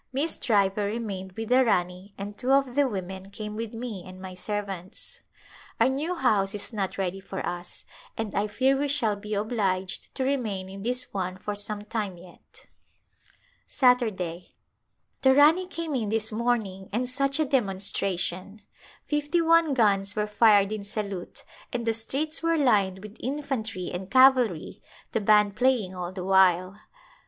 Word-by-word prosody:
Miss 285 Hz, +5 st, 0 dB
Driver 200 Hz, -2 st, +1 dB
remained 200 Hz, -4 st, -4 dB
with 225 Hz, +2 st, -6 dB
the 255 Hz, +1 st, +5 dB
Rani 185 Hz, -2 st, -1 dB
and 205 Hz, +1 st, -6 dB
two 250 Hz, +5 st, -1 dB
of 275 Hz, -2 st, +2 dB
the 285 Hz, +1 st, +3 dB
women 190 Hz, -2 st, -6 dB
came 210 Hz, +1 st, -7 dB
with 225 Hz, 0 st, -5 dB
me 225 Hz, -6 st, -5 dB
and 185 Hz, +1 st, -11 dB
my 185 Hz, 0 st, -8 dB
servants. 195 Hz, -1 st, -6 dB, 0.6 s
Our -, -, +5 dB
new 300 Hz, +7 st, -2 dB
house 210 Hz, -, +1 dB
is 210 Hz, +3 st, -4 dB
not 195 Hz, -3 st, -3 dB
ready 190 Hz, 0 st, -2 dB
for 190 Hz, 0 st, -6 dB
us 175 Hz, 0 st, -5 dB, 0.3 s
and 220 Hz, -3 st, -3 dB
I 205 Hz, +1 st, 0 dB
fear 265 Hz, +5 st, +2 dB
we 285 Hz, +2 st, 0 dB
shall 255 Hz, -7 st, +1 dB
be 210 Hz, +1 st, -5 dB
obliged 195 Hz, -3 st, -2 dB
to 265 Hz, -, -1 dB
remain 220 Hz, -9 st, -2 dB
in 195 Hz, +1 st, -9 dB
this 250 Hz, +3 st, -2 dB
one 185 Hz, -1 st, -3 dB
for 210 Hz, +2 st, -4 dB
some 205 Hz, 0 st, -4 dB
time 210 Hz, -4 st, -4 dB
yet. 175 Hz, 0 st, -17 dB, 1.0 s
Saturday, 210 Hz, -, +1 dB, 0.7 s
The 265 Hz, 0 st, +5 dB
Rani 320 Hz, +6 st, +5 dB
came 335 Hz, -4 st, -4 dB
in 230 Hz, -6 st, -1 dB
this 220 Hz, 0 st, 0 dB
morning 215 Hz, -5 st, -1 dB
and 240 Hz, +5 st, -1 dB
such 275 Hz, +3 st, 0 dB
a 310 Hz, -, +3 dB
dem 260 Hz, -6 st, +2 dB
onstration! 195 Hz, 0 st, 0 dB, 0.4 s
Fifty 295 Hz, +3 st, 0 dB
one 330 Hz, -3 st, +4 dB
guns 200 Hz, -4 st, +2 dB
were 210 Hz, -1 st, 0 dB
fired 210 Hz, -1 st, +4 dB
in 215 Hz, -2 st, -4 dB
salute 200 Hz, -3 st, -6 dB, 0.3 s
and 235 Hz, -1 st, -3 dB
the 225 Hz, -, +2 dB
streets 275 Hz, +8 st, 0 dB
were 330 Hz, 0 st, +2 dB
lined 200 Hz, -9 st, +2 dB
with 215 Hz, +1 st, -10 dB
infantry 255 Hz, -9 st, -3 dB
and 185 Hz, +2 st, -5 dB
cavalry, 255 Hz, -9 st, +4 dB, 0.3 s
the 225 Hz, -, 0 dB
band 210 Hz, -1 st, +4 dB
playing 235 Hz, -5 st, +1 dB
all 180 Hz, -1 st, -5 dB
the 185 Hz, -1 st, -6 dB
while. 190 Hz, 0 st, +3 dB
210 Hz, 165 wpm, -26 LUFS, 190-255 Hz, 1.0 s, the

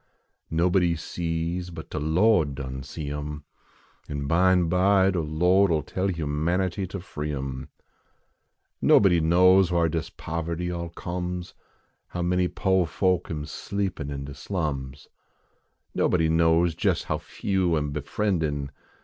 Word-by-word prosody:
Nobody 85 Hz, +1 st, +2 dB
sees 85 Hz, +2 st, -3 dB
but 80 Hz, -2 st, -9 dB
de 75 Hz, -, -3 dB
Lo 90 Hz, +6 st, +3 dB
d 70 Hz, -2 st, -5 dB
done 65 Hz, -1 st, -5 dB
see 70 Hz, +2 st, -6 dB
em. 75 Hz, 0 st, -5 dB, 0.7 s
An 70 Hz, -1 st, -3 dB
bime 90 Hz, +3 st, +3 dB
by 95 Hz, +2 st, +4 dB
de 90 Hz, -, -1 dB
Lo 90 Hz, +5 st, +3 dB
d 85 Hz, -, +1 dB
11 75 Hz, -2 st, 0 dB
tell 95 Hz, +1 st, -2 dB
humanity 85 Hz, +3 st, -1 dB
ter 95 Hz, -, -6 dB
free 75 Hz, -5 st, -5 dB
em. 65 Hz, -2 st, -5 dB, 1.1 s
Nobody 90 Hz, -4 st, +5 dB
knows 90 Hz, +3 st, +5 dB
whar 85 Hz, -1 st, +3 dB
dis 80 Hz, 0 st, -2 dB
poverty 85 Hz, +2 st, -4 dB
all 85 Hz, -1 st, -4 dB
comes 90 Hz, +1 st, -5 dB, 0.5 s
How 90 Hz, -, -4 dB
many 90 Hz, +1 st, +2 dB
po 95 Hz, 0 st, +1 dB
folk 90 Hz, +2 st, 0 dB
am 75 Hz, -2 st, -4 dB
sleepin 95 Hz, -1 st, -4 dB
in 70 Hz, -1 st, -5 dB
de 70 Hz, -, -8 dB
slums. 70 Hz, -4 st, -4 dB, 0.9 s
Nobody 80 Hz, -3 st, +2 dB
knows 80 Hz, +1 st, +3 dB
jes -, -, +2 dB
how -, -, -2 dB
few 95 Hz, -4 st, -1 dB
am 75 Hz, -1 st, -2 dB
befriendin 75 Hz, -2 st, -1 dB
85 Hz, 140 wpm, -26 LUFS, 75-90 Hz, 1.1 s, Nobody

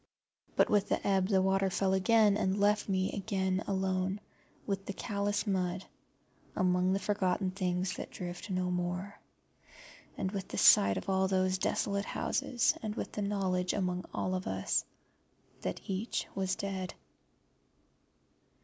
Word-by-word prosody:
But -, -, +5 dB
with 205 Hz, -1 st, +2 dB
the -, -, 0 dB
ebb 190 Hz, -2 st, +3 dB
the 190 Hz, -2 st, +3 dB
water 195 Hz, 0 st, +2 dB
fell 190 Hz, +1 st, +1 dB
again, 210 Hz, +2 st, +4 dB
and 195 Hz, -1 st, 0 dB
left 205 Hz, +1 st, +2 dB
me 190 Hz, -1 st, +1 dB
alone -, -, -3 dB
again 190 Hz, -1 st, -1 dB, 0.5 s
with 195 Hz, -1 st, -3 dB
the 200 Hz, -, -3 dB
callous 205 Hz, 0 st, -1 dB
mud 185 Hz, -2 st, -1 dB, 0.7 s
among 180 Hz, 0 st, +2 dB
the 195 Hz, -, +1 dB
forgotten 190 Hz, -2 st, 0 dB
things 185 Hz, -1 st, -1 dB
that -, -, -6 dB
drift 175 Hz, +3 st, -7 dB
no 185 Hz, -1 st, 0 dB
more, 180 Hz, +3 st, -3 dB, 1.0 s
and 185 Hz, -, -2 dB
with 195 Hz, -2 st, -4 dB
the -, -, -6 dB
sight 100 Hz, 0 st, +6 dB
of -, -, -5 dB
all 190 Hz, 0 st, +2 dB
those 185 Hz, -1 st, +1 dB
desolate 200 Hz, +1 st, 0 dB
houses, 240 Hz, -2 st, +1 dB
and 215 Hz, -1 st, -4 dB
with -, -, -4 dB
the 210 Hz, -, -4 dB
knowledge 190 Hz, -3 st, 0 dB
among 180 Hz, -2 st, -1 dB
all 185 Hz, -, -2 dB
of 185 Hz, 0 st, -3 dB
us 95 Hz, 0 st, 0 dB, 0.8 s
that -, -, -3 dB
each 195 Hz, +4 st, -2 dB
was 190 Hz, -1 st, -1 dB
dead. 190 Hz, -2 st, -4 dB
190 Hz, 150 wpm, -32 LUFS, 185-200 Hz, 1.0 s, sight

